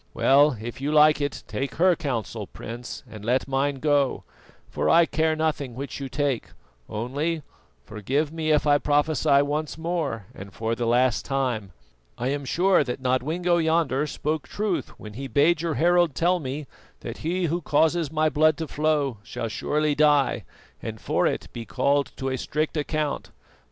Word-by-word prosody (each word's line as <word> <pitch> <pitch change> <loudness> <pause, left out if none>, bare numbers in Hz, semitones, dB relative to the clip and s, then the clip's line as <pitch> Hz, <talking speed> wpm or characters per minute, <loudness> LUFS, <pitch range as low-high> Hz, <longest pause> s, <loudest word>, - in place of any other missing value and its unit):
Well, 140 -1 +4
if 120 +4 -7
you 145 +2 -1
like 150 0 +5
it, 145 -1 -3
take 135 0 -4
her 180 +1 +4
counsel, 115 - -4
Prince, 120 +2 -8
and 110 -2 -10
let 125 +4 +1
mine 135 +1 0
go, 145 -1 +1 0.4
for - - -1
I 170 0 +6
care 160 -1 +1
nothing 150 -6 -2
which 140 +3 -6
you 135 -1 -5
take; 140 -2 -1 0.4
only, 145 +9 -2 0.4
forgive 135 +9 -2
me 160 -1 -2
if 150 -1 +3
I 145 -1 +4
prophesy 145 -1 +3
once 150 +2 -3
more 160 - -2
and 100 +1 -10
for 115 0 -2
the 115 0 -2
last 125 0 +2
time 125 -8 -2 0.5
I 125 +2 -1
am 140 0 -2
sure 180 +4 +3
that 125 -1 -4
Nodwengo 160 +8 +1
yonder 160 -4 +1
spoke 150 +1 -3
truth 205 -4 -2
when 105 -1 -9
he 135 +5 -6
bade 150 +4 +3
your 165 -3 -1
herald 175 -2 +3
tell 180 +2 +2
me 140 0 -5 0.4
that - - -6
he 175 +3 -1
who 170 +2 -1
causes 160 +1 +2
my 155 0 +2
blood 155 0 +3
to 160 - -4
flow 145 -5 0
shall 115 +2 -5
surely 150 +6 0
die 145 -1 +3 0.4
and - - -6
for - - +1
it - - -2
be 120 - -5
called 140 +3 +1
to 135 - -3
a 130 -1 -2
strict 155 +2 -2
account. 150 -1 -2
145 Hz, 170 wpm, -25 LUFS, 130-155 Hz, 0.5 s, I